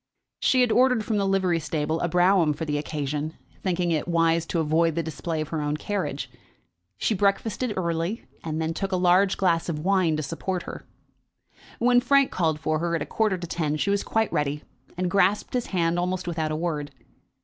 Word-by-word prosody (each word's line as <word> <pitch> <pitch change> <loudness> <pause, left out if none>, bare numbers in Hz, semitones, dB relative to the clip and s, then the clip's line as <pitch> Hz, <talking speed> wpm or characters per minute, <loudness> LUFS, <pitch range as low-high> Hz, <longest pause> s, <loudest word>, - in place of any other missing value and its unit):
She 255 - +3
had 245 -2 +3
ordered 250 -3 +3
from 215 -1 0
the 200 -1 +1
livery 190 -3 +2
stable 155 0 -2
a - - 0
brougham 175 -2 +3
for 160 +2 -5
the 150 -1 -1
occasion, 150 +1 -3 0.3
thinking 180 -2 0
it 155 0 0
wise 165 -1 +2
to 170 - -1
avoid 160 +1 +2
the 170 - 0
display 160 +1 -3
of 155 - -5
her 160 -2 -2
own 150 0 -1
carriage. 150 -9 -3 0.7
She 220 - +1
breakfasted 205 +3 0
early, 170 +4 -2 0.2
and 160 -1 -3
then 160 0 -1
took 195 +3 -3
a - - +1
large 185 +2 +3
glass 170 -3 +1
of 160 - -2
wine 185 -5 +2
to 155 - -2
support 175 +5 -3
her. - - -9 0.9
When 245 +1 +4
Frank 275 +2 +3
called 160 -4 0
for 155 0 0
her 170 0 0
at 160 - -1
a - - -7
quarter 215 -4 0
to 175 - -6
ten, 155 -3 -1
she 200 - 0
was 200 0 +1
quite 220 -1 0
ready, 150 0 -1 0.3
and 180 0 0
grasped 195 +2 +2
his 250 -2 -1
hand 170 -2 0
almost 180 +1 -2
without 160 -2 -1
a - - -1
word. 155 -3 -2
170 Hz, 205 wpm, -25 LUFS, 155-195 Hz, 0.9 s, When